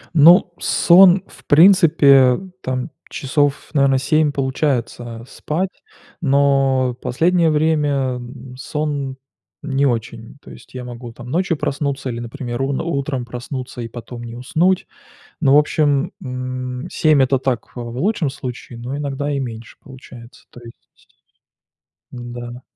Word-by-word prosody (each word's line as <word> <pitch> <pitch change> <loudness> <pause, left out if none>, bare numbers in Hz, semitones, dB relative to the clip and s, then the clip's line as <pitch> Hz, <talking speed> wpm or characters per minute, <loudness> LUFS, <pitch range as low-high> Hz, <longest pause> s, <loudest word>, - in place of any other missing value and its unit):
Ну, 170 +3 +6
сон, 185 +1 +5
в - - -18
принципе, 145 -6 +6 0.2
там 130 +3 -3 0.2
часов, 145 0 -1
наверное, 140 -2 +3
7, 150 +3 +2
получается 125 -4 -2
спать, 170 +7 -3 0.5
но 135 -3 +2
в - - -8
последнее 170 +5 +2
время 145 -4 +1
н 125 +1 -10
сон 140 -1 -3 0.5
не 140 -1 0
очень. 115 +1 -4
То - - -13
есть, - - -15
я 125 - -5
могу 120 -1 -8
там 120 +1 -11
ночью 175 -1 0
проснуться 140 -2 -2
или, 120 - -4
например, 120 +1 -5
ун 135 0 -1
утром 140 -5 -2
проснуться 125 +1 -7
и 115 - -4
потом 120 +1 -9
не 115 0 -8
уснуть. 170 +9 0 0.5
Но, 140 -2 +4
в - - +8
общем, 150 +1 +1
м 125 0 -5
7- 155 -3 +3
это 135 +1 +2
так, 125 -3 -2
э, 120 - -5
в 120 0 -7
лучшем 180 -5 0
случае, 125 -2 -8
но 125 +4 -5
иногда 145 0 -3
и 140 - -1
меньше 115 -3 -7
получается, 125 -2 -14
то 120 - -14
есть. 115 - -17 1.0
Н-да. 120 0 -8
135 Hz, 140 wpm, -19 LUFS, 125-150 Hz, 1.0 s, в